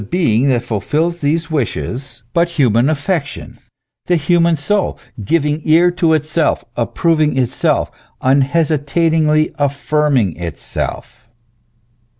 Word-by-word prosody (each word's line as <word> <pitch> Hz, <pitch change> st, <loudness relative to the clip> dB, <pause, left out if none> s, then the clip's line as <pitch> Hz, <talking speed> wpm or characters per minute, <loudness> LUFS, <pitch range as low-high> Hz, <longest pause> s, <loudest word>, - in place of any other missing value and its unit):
being 135 Hz, -8 st, +2 dB
that 125 Hz, -2 st, +1 dB
fulfils 155 Hz, -, -1 dB
these 160 Hz, +3 st, -1 dB
wishes 130 Hz, -3 st, -3 dB
but 170 Hz, +1 st, +2 dB
human 125 Hz, -1 st, +3 dB
affection, 155 Hz, 0 st, -3 dB, 0.5 s
the 180 Hz, -, +3 dB
human 170 Hz, +1 st, +2 dB
soul, 195 Hz, +7 st, -1 dB, 0.3 s
giving 150 Hz, +5 st, 0 dB
ear 170 Hz, +3 st, +4 dB
to 170 Hz, -2 st, +1 dB
itself, 155 Hz, +1 st, 0 dB
approving 155 Hz, +4 st, +1 dB
itself, 125 Hz, -3 st, 0 dB, 0.3 s
unhesitatingly 155 Hz, +2 st, +1 dB
affirm 145 Hz, +1 st, +1 dB
ing 95 Hz, -9 st, 0 dB
itself 85 Hz, +6 st, -6 dB
150 Hz, 105 wpm, -16 LUFS, 130-165 Hz, 0.5 s, ear